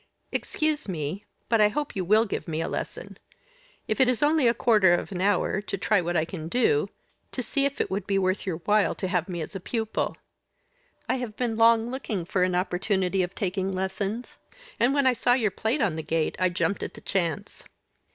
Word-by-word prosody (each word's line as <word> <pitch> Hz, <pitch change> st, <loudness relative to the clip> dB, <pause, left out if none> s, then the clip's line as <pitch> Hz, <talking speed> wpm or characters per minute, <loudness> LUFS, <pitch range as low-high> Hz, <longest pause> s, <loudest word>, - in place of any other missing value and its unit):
"Excuse 310 Hz, -3 st, -1 dB
me 170 Hz, +4 st, -4 dB, 0.2 s
but 225 Hz, 0 st, +3 dB
I 210 Hz, -, +7 dB
hope 295 Hz, +7 st, -3 dB
you 190 Hz, -, -1 dB
will 215 Hz, +5 st, +4 dB
give 200 Hz, -, -4 dB
me 160 Hz, -1 st, -2 dB
a 165 Hz, -, -1 dB
lesson; -, -, -6 dB, 0.7 s
if -, -, +1 dB
it 260 Hz, -, +6 dB
is 250 Hz, +2 st, +1 dB
only 295 Hz, -3 st, +4 dB
of 235 Hz, -, +4 dB
a -, -, -25 dB
quarter 210 Hz, -8 st, +5 dB
of 175 Hz, -, -4 dB
an 180 Hz, -2 st, -3 dB
hour, 200 Hz, 0 st, +1 dB
to 205 Hz, -, -4 dB
try 200 Hz, +1 st, +2 dB
what 175 Hz, 0 st, -1 dB
I 155 Hz, -, +2 dB
can 165 Hz, -2 st, -6 dB
do 430 Hz, -, +2 dB, 0.4 s
to 250 Hz, -, -4 dB
see 275 Hz, +3 st, 0 dB
if 280 Hz, 0 st, -2 dB
it -, -, -1 dB
would 195 Hz, +2 st, -2 dB
be 200 Hz, -1 st, +1 dB
worth 185 Hz, 0 st, +1 dB
your 185 Hz, -5 st, -2 dB
while 210 Hz, 0 st, +3 dB
to 190 Hz, -, -3 dB
have 180 Hz, 0 st, -1 dB
me 175 Hz, -2 st, -3 dB
as 155 Hz, -, -7 dB
a -, -, -3 dB
pupil. 220 Hz, +3 st, -2 dB, 0.9 s
I -, -, +1 dB
have 240 Hz, -4 st, -5 dB
been 240 Hz, -3 st, -1 dB
long 230 Hz, +1 st, +4 dB
looking 220 Hz, -9 st, -3 dB
for 180 Hz, +1 st, -1 dB
an 180 Hz, 0 st, +2 dB
opportunity 185 Hz, +1 st, 0 dB
of 180 Hz, +1 st, -3 dB
taking 190 Hz, 0 st, -1 dB
lessons, 195 Hz, +5 st, -3 dB, 0.4 s
and 250 Hz, +4 st, +3 dB
when 280 Hz, -1 st, +3 dB
I 260 Hz, -, +5 dB
saw 245 Hz, 0 st, +2 dB
your 225 Hz, -5 st, +2 dB
plate 230 Hz, +9 st, -1 dB
on 185 Hz, -8 st, +1 dB
the -, -, -2 dB
gate 160 Hz, 0 st, -1 dB
I 185 Hz, 0 st, +3 dB
jumped 190 Hz, +3 st, -1 dB
at -, -, -5 dB
the -, -, -11 dB
chance." 170 Hz, -6 st, -2 dB
200 Hz, 220 wpm, -26 LUFS, 180-235 Hz, 0.9 s, I